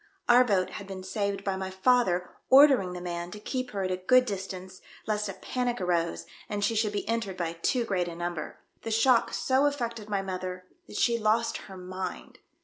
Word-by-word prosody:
Our 245 +1 +7
boat 195 -6 +1
had 200 - -7
been 190 -1 -7
saved 200 0 -2
by 195 -1 -1
my 190 0 -4
father 190 -2 +2 0.2
ordering 265 -9 +7
the 180 - -6
man 175 -1 -4
to 210 - -9
keep 255 +3 -3
her 195 -2 -3
at 185 - -1
a 185 - 0
good 250 +7 +4
distance 190 -3 -6 0.2
lest 210 -1 -1
a - - -4
panic 245 -1 -2
arose 170 - 0 0.2
and 205 -1 -2
she - - +1
should 215 -1 +1
be 205 - -3
entered 225 -4 -2
by 170 -2 -2
too 235 +9 0
great 185 -4 0
a 170 - -6
number. 175 -2 -4 0.2
The - - -5
shock 230 +2 +3
so 265 +2 +2
affected 235 -6 -3
my 200 -2 0
mother 185 -1 -5 0.2
that - - -7
she 235 -1 +2
lost 220 +1 +1
her 190 - -9
mind." 185 +1 -6
195 Hz, 205 wpm, -28 LUFS, 185-230 Hz, 0.2 s, Our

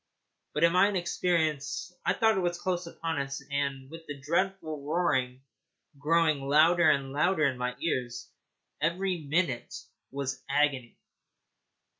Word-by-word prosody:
But, 150 - +1
in 170 - +6
my 190 +3 +5
inexperience, 170 -4 -1
I - - +2
thought 220 -1 +3
it - - +1
was 175 -1 -1
close 180 -1 -2
upon 165 -2 -3
us, 135 0 -4
and, 140 -2 -2
with 165 0 -11
the 145 -1 -7
dreadful 160 0 -2
roaring 135 -5 0 0.6
growing 155 0 +2
louder 155 +4 +4
and 140 -2 +1
louder 155 +3 +2
in 135 -2 +1
my 125 0 -2
ears, 125 -7 -3 0.5
every 180 +3 0
minute 150 -4 -1 0.3
was 135 -1 -3
an - - -34
agony. 140 -4 0
155 Hz, 140 wpm, -29 LUFS, 140-175 Hz, 0.6 s, in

